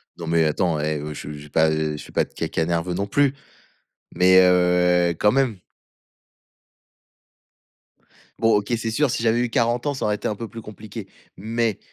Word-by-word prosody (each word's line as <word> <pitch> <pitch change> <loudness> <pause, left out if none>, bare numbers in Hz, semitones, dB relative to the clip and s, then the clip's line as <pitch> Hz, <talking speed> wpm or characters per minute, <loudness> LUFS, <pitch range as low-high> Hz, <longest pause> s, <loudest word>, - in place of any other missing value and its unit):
Non 85 - -8
mais 80 -1 +2
attends, 80 0 0
hé, 75 +1 -1
heu, 75 +1 -6
je 75 +1 -8
j'ai 75 0 -11
pas 80 +2 +3
eh, 75 -1 -1
je - - -9
fais - - -14
pas - - +1
de - - -13
caca 80 - -2
nerveux 85 +1 -1
non 100 +3 -2
plus, 140 +4 +2 0.8
mais 95 +1 +5
heu, 90 -1 +3
quand 105 - +3
même. 130 -6 +1 2.8
Bon 115 0 +3
OK, 105 +4 -4
c'est 115 0 -3
sûr, 145 +4 +1
si 115 - -2
j'avais 115 +1 +2
eu 120 -1 0
40 120 +4 0
ans, 145 - -1
ça - - -3
aurait 105 -1 +1
été - - -4
un 105 - -2
peu 115 +2 -6
plus 115 +1 -9
compliqué, 105 -1 -9 0.3
mais 110 +1 -1
95 Hz, 190 wpm, -22 LUFS, 85-115 Hz, 2.8 s, mais